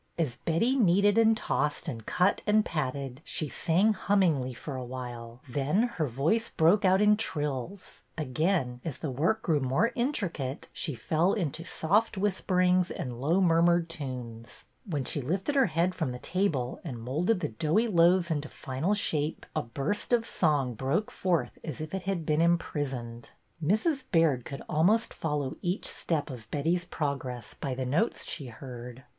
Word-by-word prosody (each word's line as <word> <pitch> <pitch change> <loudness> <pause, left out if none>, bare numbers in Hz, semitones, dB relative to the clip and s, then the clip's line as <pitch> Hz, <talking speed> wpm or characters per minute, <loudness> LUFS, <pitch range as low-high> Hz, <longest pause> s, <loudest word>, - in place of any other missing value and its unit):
As 145 -8 -1
Betty 225 +11 +1
kneaded 205 -2 +4
and 225 -1 +5
tossed 150 -6 -1
and 115 -2 -5
cut 180 +2 +2
and 210 0 +4
patted, 135 -3 -3
she 155 - -1
sang 185 +9 +2
hummingly 180 -10 +2
for 135 +3 -7
a 130 - -4
while, 120 -1 -7
then 145 - +1
her 155 -3 +1
voice 155 - +1
broke 175 +7 +3
out 190 +1 +4
in 210 0 +6
trills; 150 - -3 0.2
again, 145 -3 0
as 155 -6 -4
the 150 - -4
work 170 - 0
grew 160 -5 +2
more 135 - +1
intricate, 185 - -2
she 150 -6 -2
fell 165 - +1
into 165 -5 -2
soft 200 +6 +1
whisper 190 -2 0
ings 180 0 +3
and 125 -2 -5
low 165 +7 +2
murmured 170 -1 +3
tunes; 125 -7 -6 0.2
when 145 -5 -1
she 145 - -2
lifted 185 - -1
her 270 -4 +4
head 170 +2 +1
from 160 -8 -2
the - - -5
table 145 -4 -1
and 130 -9 -6
moulded 160 - 0
the 160 - -2
doughy 155 - +1
loaves 175 -2 +4
into 150 -1 -2
final 135 +11 -2
shape, 155 -6 -1
a - - +1
burst 140 - -3
of 235 -2 +3
song 145 - +1
broke 135 - -1
forth 170 -10 -1
as 155 -6 -6
if 155 +2 -6
it 190 - -2
had 175 -5 -1
been 150 +1 +2
imprisoned. 135 -8 -1 0.3
Mrs. 255 - +1
Baird 160 - +3
could 140 - -7
almost 190 +9 +2
follow 150 -2 -2
each 180 +1 -2
step 155 -4 -1
of 120 -4 -10
Betty's 170 +4 0
progress 135 -8 -3
by 135 -2 -4
the 130 0 -3
notes 150 - 0
she 140 - -5
heard. 125 0 -9
160 Hz, 170 wpm, -29 LUFS, 130-185 Hz, 0.3 s, in